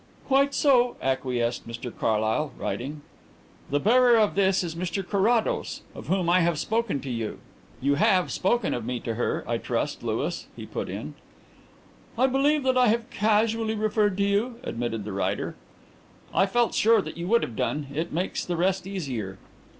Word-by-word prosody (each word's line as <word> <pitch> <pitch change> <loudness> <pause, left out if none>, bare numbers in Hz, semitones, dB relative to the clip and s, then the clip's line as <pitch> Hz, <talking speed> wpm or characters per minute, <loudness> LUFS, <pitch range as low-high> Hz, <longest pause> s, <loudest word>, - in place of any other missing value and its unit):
"Quite 275 +1 +3
so," 250 -4 +4
acquiesced 125 -3 -1
Mr 115 +1 -6
Carlyle, 110 +7 0
writing. 145 +4 -4 0.7
"'The 145 - +1
bearer 240 - +5
of 215 -2 +3
this 190 -1 +2
is 170 -2 -4
Mr 180 +2 -3
Carrados, 215 +3 +1
of - - -10
whom 185 -2 +1
I 175 +2 +5
have 170 -2 +2
spoken 220 -4 0
to 135 - -6
you.' 115 -3 -3 0.4
"You 140 +2 +2
have 185 -2 +3
spoken 235 +6 +1
of 120 - -3
me 125 +1 -3
to 115 - -3
her, 120 - -2
I - - -1
trust, - - -2
Louis?" - - -2
he - - -8
put - - -5
in. 75 - -6 1.0
"I 255 - +4
believe 275 +3 +2
that 260 -1 +3
I 250 - +5
have 230 +1 0
casually 220 +1 +1
referred 210 -2 +1
to 200 - +2
you," 205 +5 +1
admitted 115 -2 -3
the 105 - -5
writer. 100 - -1 0.8
"I 195 - +3
felt 240 +4 +1
sure 220 -5 +4
you 170 +2 -5
would 235 +4 +3
have 115 - -5
done. 150 +5 -1
It 160 +3 -2
makes 180 +4 -2
the 175 -1 -3
rest 190 +1 0
easier. 130 - -4
190 Hz, 175 wpm, -26 LUFS, 135-225 Hz, 1.0 s, bearer